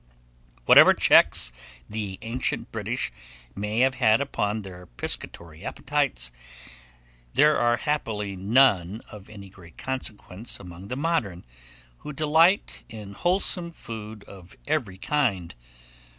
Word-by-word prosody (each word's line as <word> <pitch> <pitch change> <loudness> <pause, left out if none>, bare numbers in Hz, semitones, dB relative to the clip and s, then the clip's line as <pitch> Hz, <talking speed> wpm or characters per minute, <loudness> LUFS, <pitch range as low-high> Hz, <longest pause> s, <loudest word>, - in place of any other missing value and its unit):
Whatever - - +8
checks - - +5 0.4
the 105 -3 -5
ancient 120 +3 -3
British - - -3 0.4
may 105 +3 -1
have 130 0 +3
had 110 -1 +5
upon 110 -6 -2
their 90 -2 -11
piscatory 80 +5 -4
appetites, - - -1 1.0
there 150 +2 +5
are 120 0 +2
happily 110 -9 -2
none 100 -1 +2
of 105 -2 -12
any 100 -2 -11
great 90 -4 -16
consequence 115 -5 -4
upon 90 +1 -11
the 125 - -4
modern, 135 - -1 0.5
who 150 - -8
delight 160 +6 +2
in 105 -3 -9
wholesome 175 - 0
food 110 -8 -8
of 95 -2 -14
every 130 -12 -2
kind. 100 - -1
110 Hz, 115 wpm, -25 LUFS, 95-135 Hz, 1.0 s, Whatever